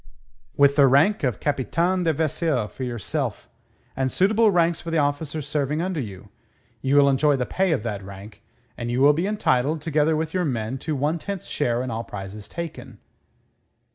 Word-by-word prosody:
"With 140 0 +4
the 140 -2 +7
rank 150 +11 +4
of 125 -7 0
Capitaine 165 +6 0
de 165 - +4
Vaisseau 155 -5 0
for 130 - -8
yourself, 120 0 -3 0.5
and 130 -1 -1
suitable 220 +4 +3
ranks 170 -3 +2
for 170 - -6
the 165 - 0
officers 145 0 -1
serving 145 0 -1
under 180 -1 -2
you. 100 -5 -7 0.5
You 135 +1 +1
will 145 -1 +6
enjoy 140 +2 +3
the 125 -2 -1
pay 190 +5 0
of 135 -9 0
that 105 -4 -3
rank, 100 +2 -11 0.3
and 120 - -5
you 120 +1 0
will 145 +2 +6
be 170 +6 -1
entitled, 155 -8 +1
together 155 0 +1
with 160 0 -2
your 185 -1 +1
men, 125 -3 -2
to 155 +2 -3
one 150 +5 0
tenth 200 +1 -5
share 120 -4 -1
in 130 - -4
all 115 +1 -3
prizes 100 0 -8
taken." 170 -2 -7
145 Hz, 185 wpm, -24 LUFS, 125-160 Hz, 0.5 s, the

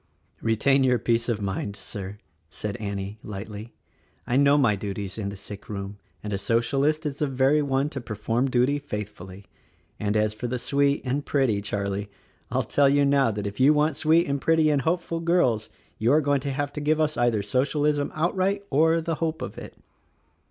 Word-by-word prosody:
"Retain 135 +5 +3
your 125 -1 +3
peace 115 +1 0
of 110 -3 -1
mind, 100 +1 -3
Sir," 100 0 -7 0.3
said 100 +4 -5
Annie, 100 0 -5
lightly, 105 +2 -8 0.5
"I 120 - -1
know 140 +1 +5
my 120 -8 +3
duties 100 0 -5
in 100 -2 -2
the 100 - -7
sick 100 +1 -10
room, 100 0 -6 0.2
and 105 -1 -4
a 100 - -1
Socialist 140 - +1
is 145 -2 -3
the 150 - +1
very 135 +3 +3
one 140 0 +1
to 140 -3 -6
perform 115 +3 -1
duty 130 +3 +2
faithfully. 105 -6 -7 0.5
And, 105 0 0
as 105 0 +1
for 110 +3 -4
the 125 +1 -2
'sweet' 140 +3 +1
and 135 +3 -1
'pretty,' 130 -9 +1
Charlie, 100 0 -3 0.4
I'll - - 0
tell 140 -1 +3
you 140 0 +3
now 140 -2 +3
that 105 -1 -3
if 100 +3 -5
you 140 +4 +6
want 150 0 +2
sweet 160 +3 +3
and 140 -1 -2
pretty 160 -1 +3
and 145 -2 +2
hopeful 165 +2 -1
girls 165 -11 +1 0.3
you 115 +3 +2
are 155 - +6
going 145 -1 +2
to 140 - -3
have 145 +1 -2
to 150 - -4
give 155 +2 +1
us 155 -1 +1
either 120 -4 +1
Socialism 145 +6 0
outright 185 +5 0
or 160 +4 +3
the 165 +1 -2
hope 160 -1 -1
of - - -6
it. - - -10
130 Hz, 195 wpm, -25 LUFS, 105-145 Hz, 0.5 s, you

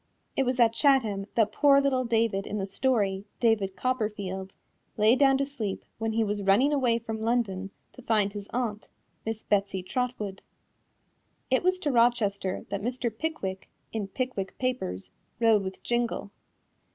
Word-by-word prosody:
It 270 - +1
was 255 0 0
at 230 -2 +5
Chatham 225 -8 +2
that 220 -2 +3
poor 280 +3 +5
little 265 -2 +1
David 225 -4 +1
in 210 - -3
the 195 - -1
story, 200 -3 0
David 210 -5 +2
Copperfield, 205 -6 -2 0.4
lay 215 +3 +5
down 270 0 +5
to 275 - 0
sleep 230 -9 -4
when 225 0 -1
he 225 0 +2
was 205 -1 -2
running 205 +10 +4
away 250 -5 +2
from 220 -1 -5
London 220 -5 0 0.2
to 255 - -12
find 210 -4 +1
his 205 -1 -7
aunt, 230 -4 -3 0.4
Miss 225 -1 -3
Betsy 200 -2 0
Trotwood. 215 -2 -3 1.1
It 260 - +4
was 370 +1 +2
to 295 - 0
Rochester 220 -6 +1
that 200 0 -3
Mr. 240 0 -2
Pickwick 220 -11 -4 0.2
in 215 -3 -2
Pickwick 205 -3 -4
Papers, 95 - -3 0.3
rode 225 -3 +5
with 190 0 -6
Jingle. 240 -4 -1
225 Hz, 155 wpm, -28 LUFS, 200-255 Hz, 1.1 s, at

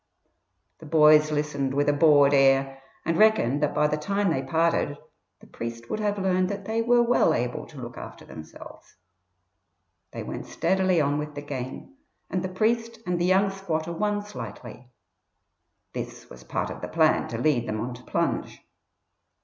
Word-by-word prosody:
The 160 - -11
boys 155 0 +6
listened 145 -3 -1
with 145 +1 +1
a 145 - +4
bored 145 -2 +5
air 135 0 +3 0.2
and 165 0 0
reckoned 180 - +4
that 150 - 0
by 150 - +3
the 150 0 -1
time 200 +4 0
they 135 - 0
parted 160 0 0 0.4
the - - -15
priest 115 0 -7
would - - -2
have 205 -1 -1
learnt 185 -1 +1
that 200 -1 -5
they 225 +2 -1
were 240 +1 +4
well 240 +1 +3
able 120 +1 -3
to 150 - -14
look 120 -1 -8
after - - -10
themselves. 80 0 -12 1.1
They - - -7
went - - -6
steadily 190 -2 +1
on 145 0 +1
with 150 0 -6
the 145 - -6
game, 135 - -7 0.3
and 185 - -1
the 185 - -3
priest 230 +4 0
and 175 -1 -1
the - - +2
young 190 +2 +3
squatter 170 -4 -3
won 205 +3 -1
slightly; 125 - -9 1.0
this - - -7
was 60 - -12
part - - -3
of - - -8
the - - -4
plan - - +2
to 115 - -5
lead 120 -2 +1
them 110 0 -3
on 120 +3 -4
to 125 - -11
plunge. - - -2
150 Hz, 175 wpm, -26 LUFS, 135-190 Hz, 1.1 s, boys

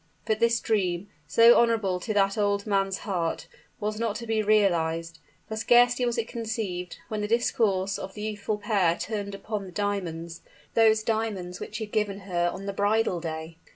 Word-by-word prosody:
But 215 0 0
this 235 0 +3
dream 190 -3 -1 0.2
so 230 +8 +7
honorable 220 -6 +2
to 215 - -4
that 195 -1 +3
old 200 -1 +1
man's 195 -2 +1
heart 175 -5 -2 0.3
was 215 +1 -2
not 230 -3 -1
to 235 - -5
be 220 -1 +1
realized; 165 -6 +1 0.3
for 220 - -4
scarcely 245 +2 +4
was 240 - -1
it 230 -1 -1
conceived, 220 -6 -4
when 215 -1 -2
the 210 - -1
discourse 205 -4 +1
of 190 - -7
the 210 - -6
youthful 210 0 -2
pair 195 -6 +1
turned 205 -2 -4
upon 200 0 -4
the - - -10
diamonds 170 -5 -3 0.3
those 220 -1 +4
diamonds 215 -6 -2
which - - -6
he 220 - -3
had 210 - -19
given 205 -2 0
her 175 -2 0
on 195 +2 -7
the 200 - -3
bridal 205 -2 +1
day! 160 0 -6
205 Hz, 185 wpm, -27 LUFS, 185-220 Hz, 0.3 s, so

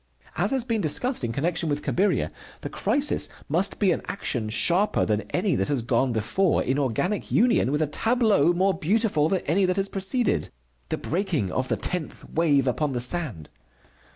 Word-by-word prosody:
As 195 +5 0
has 265 -1 0
been 230 -3 -1
discussed 240 - +1
in 115 - -1
connection 165 +5 -1
with 145 0 -2
Cabiria, 200 +3 0 0.3
the - - -5
crisis 290 +1 0 0.2
must 180 +6 0
be 195 -3 +2
an - - -1
action 120 - -3
sharper 175 - +2
than 105 -1 0
any 185 0 0
that - - 0
has 140 -5 -1
gone 125 +2 +1
before 140 - +1
in 135 +3 0
organic 145 - -1
union 230 - +3
with 150 +2 +1
a - - +2
tableau 215 - +2
more 190 +2 +2
beautiful 185 -4 +1
than 190 0 0
any 180 +7 +1
that 185 0 0
has 195 0 0
preceded: 200 +4 0 0.4
the - - -1
breaking 165 - -2
of 130 +5 -1
the - - -1
tenth 180 -4 -4
wave 145 -5 +2
upon 140 +3 0
the 125 - -1
sand. 125 - -2
170 Hz, 180 wpm, -25 LUFS, 135-200 Hz, 0.4 s, union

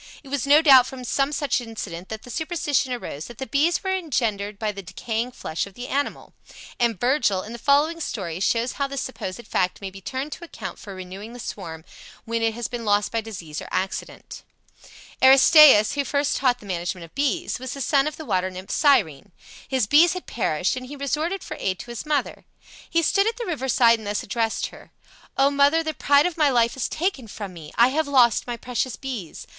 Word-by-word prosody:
It 275 - -13
was 280 -1 -2
no 295 +3 +6
doubt 265 -4 +8
from 260 -1 -8
some 275 +3 0
such 290 -3 0
incident 200 -7 -7
that 220 0 -6
the 245 - -10
superstition 295 -3 -1
arose 165 - -5
that 240 - -11
the 265 - -4
bees 300 +8 +1
were 380 -1 0
engendered 220 - -2
by 215 0 -1
the 200 -1 -8
decaying 225 +6 -4
flesh 160 -2 -4
of 195 - -15
the 245 +1 -7
animal; 285 +1 -3 0.5
and 235 -5 +1
Virgil, 240 -7 +1
in 220 - -8
the 235 - -8
following 300 +6 +2
story, 180 - -4
shows 230 +5 +1
how 280 - -2
this 275 -1 -4
supposed 235 -3 -6
fact 180 -4 0
may 195 -1 -6
be 195 +1 -12
turned 265 +8 -4
to 345 - -8
account 340 - -8
for 200 -2 -9
renewing 190 +5 -8
the 245 - -10
swarm 165 -8 -7 0.4
when 230 0 -2
it 225 -1 +1
has 240 0 -3
been 240 -1 -5
lost 205 -1 +1
by 230 - 0
disease 175 -9 -7
or - - -8
accident: 190 +1 -4 0.8
Aristaeus, 265 -3 +8
who 285 - 0
first 285 0 0
taught 250 -2 +2
the 210 - -14
management 175 -1 -4
of 165 - -19
bees, 290 +4 -1
was 260 +1 -5
the - - -8
son 275 +2 +2
of 305 - -5
the 315 - -8
water 185 -5 0
nymph 185 +1 -9
Cyrene. 205 - +2 0.4
His 260 -4 +1
bees 305 +10 +5
had 365 - -6
perished, 185 -4 -1
and 255 0 -6
he 290 - -8
resorted 305 +7 -2
for - - -7
aid 185 -1 -1
to 240 - -9
his 235 +4 -7
mother. 300 -2 -1 0.5
He 335 0 +2
stood 395 +6 +3
at 455 - -1
the 475 - -4
river 300 - -3
side 230 -2 +5
and 215 - -9
thus 205 0 -2
addressed 225 +1 -1
her: - - -14 0.5
"O 275 +1 +4
mother, 285 +3 +3
the 315 -1 -3
pride 285 +2 +3
of 355 -2 -2
my 300 -3 +4
life 235 -2 +2
is 265 - -2
taken 315 - -2
from 200 -2 -7
me! 155 -3 -10
I 235 +2 +5
have 310 +3 0
lost 250 -5 +4
my 240 -1 -3
precious 250 +1 -3
bees. 240 - -7
245 Hz, 220 wpm, -24 LUFS, 205-285 Hz, 0.8 s, doubt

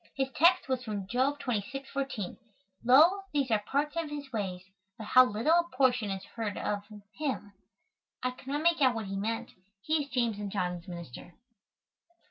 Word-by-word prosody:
His 270 -1 0
text 340 +4 +4
was 260 -2 -1
from 205 -4 -4
Job 260 +6 +1
26, 250 +2 -3
14: 270 -9 -3 0.5
"Lo 310 +11 +6
these 275 -4 0
are 215 - +4
parts 285 +8 -1
of 330 -2 -2
his 290 -2 -6
ways, 190 -4 -3 0.3
but 220 - -7
how 255 - +9
little 255 +9 +3
a - - -16
portion 245 -5 +3
is 195 -1 -4
heard 215 -1 -5
of 205 -1 -1 0.4
him." 260 -9 -3 0.7
I 255 - +1
could 255 +1 -16
not 290 +3 -1
make 335 -2 +3
out 255 -3 +5
what 225 -2 -3
he 195 0 -4
meant. 220 +3 -2 0.3
He 310 0 +1
is 285 - -12
James' 235 -5 0
and 205 -1 -4
John's 180 -2 -2
minister. 170 -2 -9
250 Hz, 180 wpm, -30 LUFS, 205-280 Hz, 0.7 s, how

